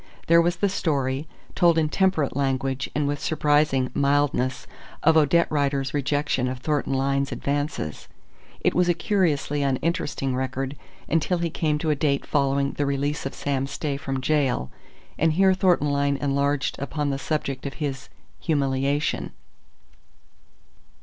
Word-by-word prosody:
There 170 Hz, +1 st, +6 dB
was 175 Hz, +1 st, +1 dB
the 200 Hz, -, +1 dB
story, 145 Hz, -6 st, -1 dB, 0.3 s
told 170 Hz, -2 st, +4 dB
in 160 Hz, -1 st, +3 dB
temperate 165 Hz, -4 st, +1 dB
language 135 Hz, -1 st, -1 dB
and 145 Hz, -1 st, +1 dB
with 145 Hz, 0 st, -1 dB
surprising 145 Hz, -4 st, +2 dB
mildness, 140 Hz, -2 st, +1 dB, 0.4 s
of 160 Hz, +1 st, +5 dB
Odette 160 Hz, +2 st, +4 dB
Rider's 140 Hz, -2 st, 0 dB
rejection 145 Hz, -2 st, 0 dB
of 130 Hz, 0 st, -3 dB
Thornton 145 Hz, +1 st, -1 dB
Lyne's 140 Hz, +1 st, 0 dB
advances. 145 Hz, -, -3 dB, 0.5 s
It -, -, +2 dB
was 180 Hz, 0 st, +2 dB
a 175 Hz, -, +3 dB
curiously 155 Hz, -7 st, 0 dB
uninteresting 140 Hz, -1 st, -1 dB
record, 130 Hz, +1 st, -3 dB, 0.3 s
until 165 Hz, +3 st, +1 dB
he 170 Hz, -1 st, -2 dB
came 155 Hz, -2 st, 0 dB
to 155 Hz, +1 st, 0 dB
a -, -, +2 dB
date 140 Hz, -1 st, 0 dB
following 140 Hz, -1 st, +1 dB
the 145 Hz, -, -2 dB
release 140 Hz, +1 st, -1 dB
of -, -, -8 dB
Sam 135 Hz, -1 st, -1 dB
Stay 140 Hz, +1 st, -3 dB
from 135 Hz, -1 st, -3 dB
gaol, 130 Hz, -, 0 dB, 0.5 s
and 160 Hz, 0 st, +3 dB
here 190 Hz, +3 st, +4 dB
Thornton 180 Hz, -6 st, +2 dB
Lyne 140 Hz, 0 st, +1 dB
enlarged 140 Hz, 0 st, 0 dB
upon 145 Hz, +1 st, -2 dB
the 135 Hz, -, -2 dB
subject 140 Hz, -1 st, -2 dB
of 140 Hz, -, -7 dB
his 140 Hz, -4 st, -4 dB, 0.3 s
"humiliation." 140 Hz, -1 st, 0 dB
145 Hz, 145 wpm, -24 LUFS, 135-155 Hz, 0.5 s, There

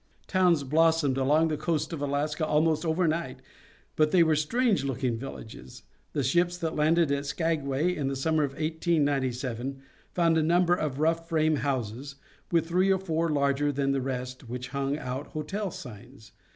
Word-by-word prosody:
Towns 180 Hz, -5 st, +2 dB
blossomed 160 Hz, -1 st, +2 dB
along 150 Hz, +5 st, +3 dB
the 155 Hz, -, -1 dB
coast 160 Hz, +1 st, -1 dB
of 155 Hz, -, -5 dB
Alaska 145 Hz, +2 st, -1 dB
almost 155 Hz, +1 st, +2 dB
over 165 Hz, +1 st, +1 dB
night, 165 Hz, +2 st, -2 dB, 0.6 s
but 155 Hz, -1 st, +3 dB
they 175 Hz, +1 st, +5 dB
were 160 Hz, -1 st, +3 dB
strange 200 Hz, -, +1 dB
looking 130 Hz, -3 st, -1 dB
villages. 110 Hz, -, -9 dB, 0.3 s
The 145 Hz, -, 0 dB
ships 175 Hz, +7 st, +1 dB
that 165 Hz, -2 st, -3 dB
landed 160 Hz, 0 st, +3 dB
at 140 Hz, 0 st, -1 dB
Skagway 160 Hz, +1 st, 0 dB
in 140 Hz, -3 st, -2 dB
the 135 Hz, -, -2 dB
summer 155 Hz, +3 st, +1 dB
of 140 Hz, -2 st, -2 dB
1897 140 Hz, -5 st, -1 dB, 0.3 s
found 165 Hz, -2 st, +2 dB
a -, -, +2 dB
number 175 Hz, +2 st, +3 dB
of 150 Hz, -6 st, -1 dB
rough 165 Hz, +2 st, 0 dB
frame 155 Hz, -2 st, +2 dB
houses, 135 Hz, 0 st, -3 dB, 0.4 s
with 165 Hz, -2 st, +2 dB
three 180 Hz, +3 st, +2 dB
or 190 Hz, -, +3 dB
four 165 Hz, -3 st, -1 dB
larger 145 Hz, 0 st, +1 dB
than 140 Hz, 0 st, 0 dB
the 135 Hz, -1 st, 0 dB
rest 125 Hz, -1 st, -5 dB
which 125 Hz, +1 st, -5 dB
hung 140 Hz, +1 st, -2 dB
out 130 Hz, -1 st, -5 dB
hotel 190 Hz, +7 st, -4 dB
signs. 120 Hz, -, -11 dB
150 Hz, 170 wpm, -27 LUFS, 135-165 Hz, 0.6 s, they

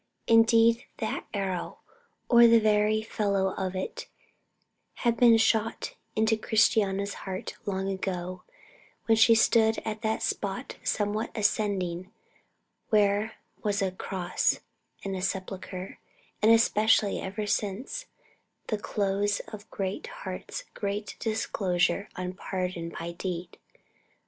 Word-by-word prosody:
Indeed, 230 Hz, 0 st, +5 dB
that -, -, -3 dB
arrow, 190 Hz, -4 st, -3 dB, 0.5 s
or 235 Hz, -1 st, +8 dB
the 230 Hz, 0 st, +7 dB
very 215 Hz, 0 st, +2 dB
fellow 200 Hz, -3 st, 0 dB
of 190 Hz, -1 st, -3 dB
it, 185 Hz, -, -4 dB, 1.0 s
had 235 Hz, -1 st, +4 dB
been 235 Hz, -2 st, +6 dB
shot 225 Hz, 0 st, +1 dB, 0.2 s
into 220 Hz, +1 st, +3 dB
Christiana's 205 Hz, -2 st, +2 dB, 0.2 s
heart 185 Hz, 0 st, -4 dB
long 190 Hz, -1 st, -1 dB
ago 185 Hz, -2 st, -3 dB, 0.6 s
when 225 Hz, -, +4 dB
she 225 Hz, +1 st, +6 dB
stood 225 Hz, 0 st, +4 dB
at 215 Hz, 0 st, -3 dB
that 220 Hz, -1 st, -1 dB
spot -, -, -3 dB
somewhat 210 Hz, 0 st, 0 dB
ascending 200 Hz, -4 st, 0 dB, 0.8 s
where 210 Hz, +1 st, +2 dB, 0.3 s
was 205 Hz, -1 st, 0 dB
a 195 Hz, -2 st, 0 dB
cross 185 Hz, -1 st, -1 dB, 0.4 s
and 195 Hz, -1 st, -3 dB
a 185 Hz, -, -4 dB
sepulchre; 190 Hz, 0 st, -4 dB, 0.4 s
and, 215 Hz, +1 st, +6 dB
especially, 220 Hz, -2 st, +4 dB
ever 205 Hz, +3 st, -4 dB
since 225 Hz, -, -2 dB, 0.6 s
the 215 Hz, -, -1 dB
close 205 Hz, 0 st, 0 dB
of 210 Hz, -1 st, -10 dB
Greatheart's -, -, -5 dB
great 205 Hz, +1 st, -3 dB
discourse 190 Hz, -5 st, +1 dB, 0.2 s
on 180 Hz, 0 st, -4 dB
pardon 180 Hz, -3 st, -4 dB
by 170 Hz, +1 st, -4 dB
deed. 175 Hz, 0 st, -5 dB
205 Hz, 115 wpm, -28 LUFS, 190-220 Hz, 1.0 s, or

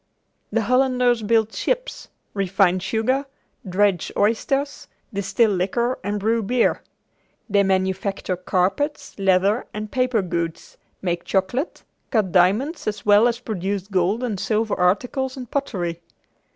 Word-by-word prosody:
The 225 Hz, +1 st, +1 dB
Hollanders 250 Hz, 0 st, +2 dB
build 220 Hz, 0 st, +2 dB
ships, -, -, -2 dB, 0.3 s
refine 195 Hz, -2 st, +2 dB
sugar, 225 Hz, +8 st, 0 dB, 0.4 s
dredge 190 Hz, -2 st, +1 dB
oysters, 270 Hz, +7 st, 0 dB, 0.3 s
distill 200 Hz, +3 st, +2 dB
liquor 220 Hz, +7 st, 0 dB
and 205 Hz, +2 st, -2 dB
brew 225 Hz, +3 st, +1 dB
beer. 240 Hz, +3 st, +1 dB, 0.7 s
They 200 Hz, -2 st, +3 dB
manufacture 190 Hz, 0 st, 0 dB
carpets, 190 Hz, -, -1 dB
leather 195 Hz, +3 st, +2 dB
and 215 Hz, 0 st, -5 dB
paper 255 Hz, -5 st, +1 dB
goods, 170 Hz, -2 st, -4 dB, 0.3 s
make 175 Hz, -2 st, -1 dB
chocolate, 205 Hz, -, -1 dB, 0.3 s
cut 215 Hz, -7 st, +1 dB
diamonds 210 Hz, -, +2 dB
as 210 Hz, -1 st, -3 dB
well 210 Hz, +3 st, +6 dB
as 235 Hz, 0 st, -1 dB
produce 200 Hz, -4 st, -3 dB
gold 195 Hz, +5 st, +1 dB
and 215 Hz, -6 st, -2 dB
silver 220 Hz, +1 st, 0 dB
articles 250 Hz, +9 st, 0 dB
and 250 Hz, -3 st, -8 dB
pottery. 175 Hz, -, -2 dB
210 Hz, 125 wpm, -22 LUFS, 190-245 Hz, 0.7 s, well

